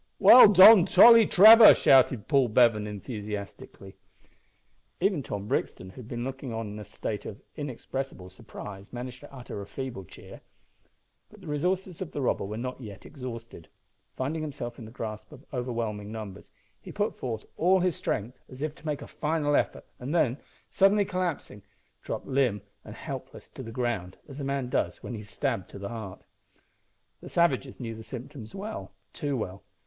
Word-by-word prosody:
"Well 250 - +9
done, 190 0 +9
Tolly 230 +1 +8
Trevor!" 220 +4 +9
shouted 130 -5 +4
Paul 135 -4 +3
Bevan, 110 -2 +3
enthusiastically. 105 -2 -8 1.0
Even 190 -4 +1
Tom 105 -5 -6
Brixton, 95 -2 -3
who - - -22
had 125 -4 -10
been 120 0 -5
looking 135 0 -6
on 115 -1 -4
in 105 - -8
a - - -7
state 105 +1 -5
of 105 - -8 0.2
inexpressible 135 -7 -6
surprise, 100 -1 -11
managed 125 +1 -7
to 145 - -14
utter 125 -6 -8
a 100 - -9
feeble 130 -7 -6
cheer. - - -14 0.9
But 210 -1 -17
the - - -13
resources 180 +4 -2
of 185 - -6
the 145 - -3
robber 120 - 0
were 105 +2 -6
not 125 +2 -5
yet 105 -5 -10
exhausted. 115 - -9 0.5
Finding 150 +5 -3
himself 135 -6 -6
in 115 - -9
the 110 - -11
grasp 110 0 -7
of 145 -1 -14
overwhelming 115 -5 -4
numbers, 105 -3 -8 0.3
he - - -10
put 205 +1 -2
forth 115 -4 -5
all 185 +3 +3
his 180 -2 +1
strength, 120 +5 -4
as 130 +3 -8
if 155 -1 -2
to - - -17
make 150 -2 -3
a - - -10
final 150 -1 -1
effort, - - -1
and 135 +7 -4
then, 135 -4 +1 0.3
suddenly 200 +1 +3
collapsing, 180 - -4 0.4
dropped - - -5
limp 125 -7 0 0.2
and - - -10
helpless - - -8
to - - -10
the 115 -3 -8
ground, 115 -7 -3
as 140 -1 -10
a - - -4
man 135 -1 -2
does 125 - -2
when - - -6
he 110 - -5
is 105 - -12
stabbed 115 -3 -3
to - - -10
the 100 0 -6
heart. 110 -5 -8 1.0
The - - -11
savages 140 -6 0
knew 115 -3 -5
the 110 - -10
symptoms 120 - -9
well 195 - -7 0.2
too 145 -2 -3
well! 95 -3 -5
125 Hz, 180 wpm, -27 LUFS, 110-150 Hz, 1.0 s, Well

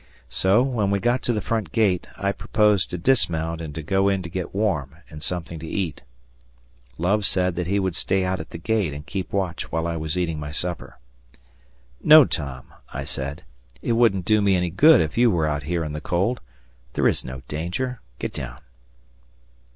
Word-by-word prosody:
So, 100 +6 +3
when 120 -7 0
we 100 - +2
got 120 +5 +1
to - - 0
the 105 -4 -1
front 110 -8 -1
gate, 100 -4 +1
I 100 +1 0
proposed 105 -1 +2
to 90 - -4
dismount 85 -6 +1
and 75 -3 -7
to 80 - -5
go 95 +4 +2
in 95 -1 0
to 85 - -6
get 90 0 -4
warm 80 -10 0 0.2
and 75 -1 -9
something 85 0 -4
to 80 - -7
eat. 85 -5 -3 1.0
Love 100 +6 +1
said 90 -2 +2
he 90 +3 0
would 95 -3 0
stay 95 0 +1
out 90 0 -1
at 80 - -7
the - - -7
gate 100 -2 0
and 75 0 -8
keep 95 0 -4
watch 95 -4 -2
while 80 0 -1
I 85 -1 -2
was 80 +2 -2
eating 85 -3 -1
my 75 0 -5
supper. 85 0 -4 1.1
"No, 155 -2 +9
Tom," 70 - -5 0.2
I 70 - -4
said; 70 0 -5 0.4
"it - - 0
wouldn't 115 -6 +3
do 110 +1 +3
me 100 -2 +3
any 90 -1 0
good 155 - +6
if 80 +7 -2
you 120 0 +6
were 85 -6 +1
out 75 -1 -1
here 85 -2 0
in 75 -1 -4
the 75 - -5
cold. 95 +11 0 0.5
There - - +2
is - - +1
no 65 0 -8
danger; 90 +12 -3 0.2
get - - -4
down." - - -6
90 Hz, 195 wpm, -23 LUFS, 80-100 Hz, 1.1 s, No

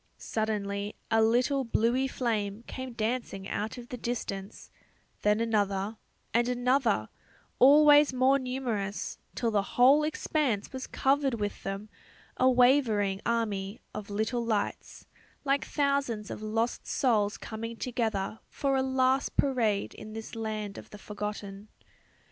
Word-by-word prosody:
Suddenly 205 -2 -2 0.2
a 225 0 +4
little 250 +5 +3
bluey 240 +3 +1
flame 220 -5 -2
came 260 -2 -6
dancing 220 -4 -3
out 220 +4 -3
of 245 0 -10
the 250 - -5
distance, 200 -5 -5 0.5
then 210 +1 +3
another, 205 -2 0 0.4
and 235 +1 +2
another, 245 - +1 0.5
always 295 +2 +7
more 260 +2 +3
numerous, 245 -6 -3 0.2
till 230 -2 0
the 205 -2 +3 0.2
whole 270 +5 +7
expanse 295 -7 -1
was 260 0 -5
covered 270 -1 +1
with 205 -2 -3
them; 195 +2 -5 0.5
a 255 - +4
wavering 245 -6 +3
army 210 -3 -1
of 210 -1 -6
little 220 +4 -1
lights, 220 -3 -3 0.4
like 275 0 +1
thousands 280 -7 0
of - - -6
lost 225 +2 -2
souls 215 -6 +1
coming 230 +1 -6
together 225 -5 -2
for 275 -1 0
a 265 - +2
last 265 0 +1
parade 230 -7 +1
in 215 0 -10
this 225 0 -7
land 215 -2 -4
of - - -13
the 210 - -10
forgotten. 205 -1 -6
230 Hz, 130 wpm, -29 LUFS, 210-260 Hz, 0.5 s, always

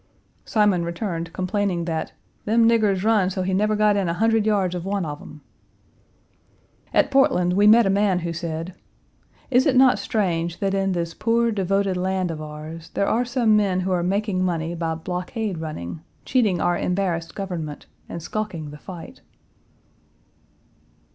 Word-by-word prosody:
Simon 205 -6 +2
returned, 170 -1 -4
complaining 185 -2 -1
that 160 -2 -3 0.3
"them 225 +2 +4
niggers 210 -5 +2
run 215 -4 +3
so 185 0 -2
he 190 +1 -1
never 210 +3 +2
got 210 -1 +3
in 195 -4 0
a 170 - -1
hundred 225 +1 +2
yards 195 -4 +1
of 175 -1 -4
one 195 -1 -1
of 145 -1 -5
them." 150 - -12 1.5
At 280 - +2
Portland, 180 -10 +3
we 205 +3 +4
met 230 +2 +7
a 195 - +2
man 200 -2 +2
who 170 - -2
said: 165 +1 -4 0.8
"Is 255 +2 +4
it 270 - +3
not 255 -4 +5
strange 175 -5 -1
that 195 -2 -1
in 195 -1 +1
this 170 -1 -2
poor, 235 +1 +1
devoted 195 -1 0
land 185 -1 -1
of 155 -1 -6
ours, 155 +2 -8
there 200 - +1
are 240 - +2
some 240 -3 +2
men 195 -3 +2
who 190 +1 -2
are 180 -1 +1
making 190 +1 0
money 170 -2 -1
by 165 -1 -2
blockade 180 +3 -4
running, 155 - -6 0.2
cheating 215 -9 +2
our 175 - +2
embarrassed 180 -3 -1
government, 170 -7 -5 0.2
and 170 - -6
skulking 175 -8 -4
the 150 - -11
fight?" 185 - -10
185 Hz, 165 wpm, -23 LUFS, 170-210 Hz, 1.5 s, met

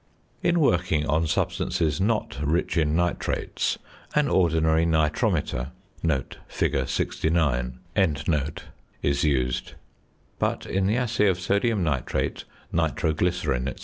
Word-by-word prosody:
In 175 0 +2
working 90 - +2
on 80 +2 +1
substances 80 0 0
not 105 -7 0
rich 80 +5 0
in 80 -2 +2
nitrates, 85 0 -1 0.4
an 150 -1 +3
ordinary 80 -4 +3
nitrometer 75 -5 +1 0.8
(fig. - - 0
69) 70 -7 0 1.3
is 70 +3 +1
used; 65 -5 0 0.7
but - - -1
in 95 0 0
the 110 +4 +2
assay 115 -4 +2
of 90 -2 +2
sodium 100 +2 +1
nitrate, 70 -6 -1 0.3
nitroglycerine, 80 -5 0
&c. - - -15
80 Hz, 105 wpm, -25 LUFS, 75-95 Hz, 1.3 s, an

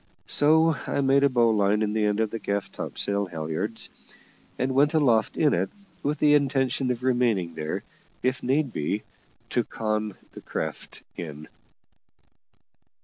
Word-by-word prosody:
So 160 +2 +4
I - - 0
made 135 +1 +4
a 140 - +5
bowline 110 -4 +3
in 105 0 -1
the 110 -1 +1
end 105 +1 +1
of 110 - 0
the 115 - -4
gaff 100 -1 -2
topsail 100 -1 -1
halliards, 85 +6 -3 0.7
and 130 +1 0
went 145 +4 +3
aloft 120 -8 +3
in 150 -2 +4
it, - - 0 0.3
with 150 +2 -1
the 150 -1 +4
intention 135 -2 +2
of 125 0 -2
remaining 120 -9 +1
there, 75 -1 -4 0.4
if 130 +1 0
need 135 0 +1
be, 100 +8 -2 0.5
to - - +2
con 110 -2 -2 0.2
the - - -10
craft - - -5
in. 75 -3 -7
115 Hz, 145 wpm, -26 LUFS, 100-135 Hz, 0.7 s, a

